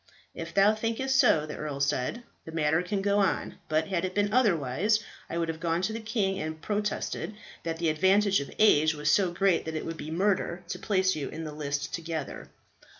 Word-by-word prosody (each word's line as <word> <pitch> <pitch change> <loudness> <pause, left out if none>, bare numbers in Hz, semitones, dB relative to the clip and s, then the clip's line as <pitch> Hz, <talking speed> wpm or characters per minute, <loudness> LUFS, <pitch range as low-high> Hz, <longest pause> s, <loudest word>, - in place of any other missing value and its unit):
"If - - -7
thou 200 +2 +6
thinkest 230 +5 -1
so," 185 - +5
the 150 - -6
earl 150 -2 -4
said, 140 - -1 0.2
"the 160 - -9
matter 160 0 +2
can 195 +2 -2
go 200 0 +2
on. 195 -3 0
But 155 +5 +1
had 185 -3 0
it 185 0 -3
been 205 0 +1
otherwise, 205 - +2 0.3
I 170 - -3
would 165 -1 0
have 160 -1 -4
gone 165 +1 0
to 215 +3 0
the 225 - -3
king 215 -4 -1
and 155 0 -4
protested 210 +2 -2 0.3
that 165 -1 -3
the 165 -1 +1
advantage 195 +5 +3
of 140 - -6
age 155 -7 +5
was 150 0 +1
so 195 -3 +3
great 185 0 +2
that 160 0 -4
it 155 - -3
would 165 0 -5
be 155 - -6
murder 180 0 0
to - - -4
place 190 -3 +1
you 145 -3 -4
in 165 - -6
the 155 - -5
list 145 0 -3
together." 165 -1 -5
175 Hz, 210 wpm, -28 LUFS, 155-205 Hz, 0.3 s, thou